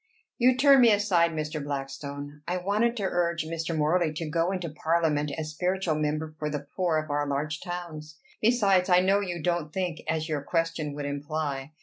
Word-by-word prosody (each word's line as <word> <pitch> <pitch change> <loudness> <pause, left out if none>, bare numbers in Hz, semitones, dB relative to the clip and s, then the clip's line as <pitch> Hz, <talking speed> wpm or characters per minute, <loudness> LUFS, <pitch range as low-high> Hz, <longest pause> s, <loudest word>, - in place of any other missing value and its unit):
"You 250 +1 +4
turn 275 -1 +7
me 235 -2 +7
aside, 200 -5 +3
Mr. 155 -2 -4
Blackstone. 145 +1 -6
I 180 - 0
wanted 210 +6 +1
to 205 - -2
urge 170 -3 0
Mr. 165 0 -3
Morley 155 +2 +2
to 155 +1 -4
go 165 +3 0
into 185 -3 -3
parliament 155 -1 0
as 155 -1 -4
spiritual 180 +1 0
member 155 +1 -2
for 150 - -2
the 145 -1 -4
poor 175 -4 +1
of 155 -1 -3
our 145 0 0
large 150 +2 -2
towns. 160 -4 -7 0.2
Besides, 200 -5 +3
I 180 0 +6
know 195 +2 +3
you 180 -4 -3
don't 170 -3 0
think 180 -2 -2
as 160 0 -1
your 150 -3 -2
question 165 -1 -1
would 145 -1 -4
imply. 145 0 -3
160 Hz, 190 wpm, -27 LUFS, 150-180 Hz, 0.2 s, turn